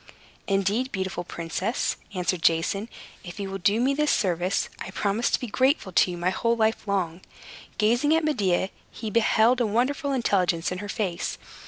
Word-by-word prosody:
"Indeed, 200 Hz, +6 st, +1 dB
beautiful 190 Hz, -2 st, -3 dB
princess," 175 Hz, +7 st, -2 dB, 0.2 s
answered 180 Hz, -1 st, -1 dB
Jason, 170 Hz, +7 st, +1 dB, 0.3 s
"if 175 Hz, +1 st, -9 dB
you 195 Hz, -1 st, -4 dB
will 195 Hz, -, -4 dB
do 200 Hz, +4 st, +2 dB
me 260 Hz, +3 st, +2 dB
this 300 Hz, +1 st, +1 dB
service, 180 Hz, -1 st, +1 dB
I -, -, -6 dB
promise 200 Hz, +4 st, 0 dB
to -, -, +1 dB
be -, -, -4 dB
grateful 255 Hz, -2 st, +1 dB
to 180 Hz, -, +4 dB
you 175 Hz, -, -4 dB
my 175 Hz, +2 st, 0 dB
whole 230 Hz, +4 st, +1 dB
life 220 Hz, -1 st, +1 dB
long." 185 Hz, -3 st, -1 dB, 0.6 s
Gazing 240 Hz, +8 st, +3 dB
at 325 Hz, -1 st, +1 dB
Medea, 195 Hz, -, +1 dB, 0.2 s
he 220 Hz, -2 st, -6 dB
beheld 230 Hz, +2 st, +3 dB
a 235 Hz, -, +2 dB
wonderful 265 Hz, +6 st, 0 dB
intelligence 185 Hz, -10 st, +1 dB
in 180 Hz, -, -3 dB
her 205 Hz, +1 st, -6 dB
face. 190 Hz, -6 st, -2 dB
200 Hz, 175 wpm, -26 LUFS, 185-235 Hz, 0.6 s, to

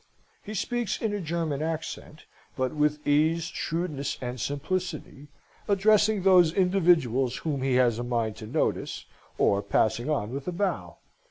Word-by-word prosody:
He 215 Hz, -, -7 dB
speaks 240 Hz, +2 st, -2 dB
in 220 Hz, -2 st, -1 dB
a 205 Hz, -, -2 dB
German 160 Hz, -3 st, -2 dB
accent, 160 Hz, -1 st, -5 dB, 0.3 s
but 130 Hz, -1 st, -1 dB
with 150 Hz, 0 st, 0 dB
ease, 155 Hz, +3 st, +3 dB
shrewdness, 155 Hz, -4 st, -3 dB
and 125 Hz, 0 st, -5 dB
simplicity, 150 Hz, -1 st, -4 dB, 0.4 s
addressing 210 Hz, 0 st, +3 dB
those 180 Hz, -4 st, +6 dB
individuals 165 Hz, -, +2 dB
whom 145 Hz, -4 st, -1 dB
he 130 Hz, -1 st, +1 dB
has 120 Hz, -3 st, +3 dB
a -, -, -2 dB
mind 115 Hz, -3 st, -1 dB
to 110 Hz, -, -8 dB
notice, 145 Hz, +8 st, -2 dB, 0.3 s
or 100 Hz, 0 st, +3 dB
passing 110 Hz, +5 st, 0 dB
on 120 Hz, -8 st, -1 dB
with 140 Hz, +1 st, -5 dB
a -, -, 0 dB
bow. 190 Hz, +2 st, -2 dB
155 Hz, 150 wpm, -27 LUFS, 130-180 Hz, 0.4 s, those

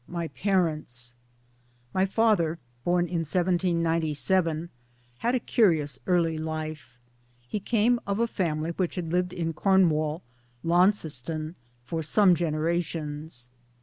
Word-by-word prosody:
II -, -, -11 dB
MY 170 Hz, -1 st, -2 dB
PARENTS 155 Hz, -11 st, -1 dB, 0.8 s
MY 190 Hz, +1 st, +2 dB
father 195 Hz, -6 st, +2 dB, 0.3 s
(born 175 Hz, +2 st, +2 dB
in 170 Hz, 0 st, -2 dB
1797) 170 Hz, -1 st, +1 dB, 0.5 s
had 240 Hz, +2 st, +1 dB
a -, -, +2 dB
curious 160 Hz, -, +2 dB
early 170 Hz, -3 st, +2 dB
life. 155 Hz, -5 st, -5 dB, 0.5 s
He 210 Hz, -, -2 dB
came 235 Hz, +3 st, +2 dB
of 200 Hz, +1 st, -1 dB
a 235 Hz, -, +3 dB
family 165 Hz, -7 st, -1 dB
which 175 Hz, 0 st, -2 dB
had 170 Hz, -3 st, -4 dB
lived 180 Hz, 0 st, +1 dB
in 165 Hz, -2 st, -2 dB
Cornwall 160 Hz, -4 st, +2 dB, 0.4 s
(Launceston) 165 Hz, -4 st, +1 dB, 0.3 s
for 165 Hz, +5 st, -3 dB
some 185 Hz, +4 st, +4 dB
generations. 155 Hz, -4 st, -2 dB
170 Hz, 115 wpm, -27 LUFS, 155-185 Hz, 0.8 s, some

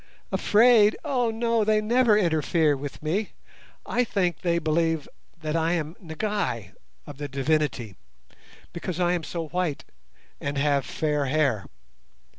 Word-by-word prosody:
"Afraid? 220 Hz, -1 st, +5 dB
Oh 250 Hz, -5 st, +1 dB
no! 230 Hz, 0 st, +1 dB
they 215 Hz, 0 st, +3 dB
never 225 Hz, 0 st, +3 dB
interfere 160 Hz, -4 st, +2 dB
with 140 Hz, +2 st, -7 dB
me. 190 Hz, +7 st, -1 dB, 0.5 s
I 245 Hz, -, +1 dB
think 185 Hz, -6 st, -1 dB
they 170 Hz, -1 st, +1 dB
believe 165 Hz, -1 st, 0 dB, 0.4 s
that 155 Hz, 0 st, -2 dB
I 165 Hz, +1 st, +1 dB
am 160 Hz, -1 st, -2 dB
'Ngai' 160 Hz, -, -3 dB, 0.3 s
(of 145 Hz, -1 st, -11 dB
the 145 Hz, -, -3 dB
Divinity) 135 Hz, -6 st, -1 dB, 0.8 s
because 170 Hz, +1 st, -4 dB
I 175 Hz, -1 st, +2 dB
am 175 Hz, -2 st, -2 dB
so 165 Hz, -1 st, -5 dB
white 180 Hz, -4 st, -2 dB, 0.5 s
and 140 Hz, 0 st, -3 dB
have 140 Hz, -1 st, +1 dB
fair 150 Hz, -2 st, -1 dB
hair. 135 Hz, -7 st, +1 dB
165 Hz, 135 wpm, -25 LUFS, 150-210 Hz, 0.8 s, Afraid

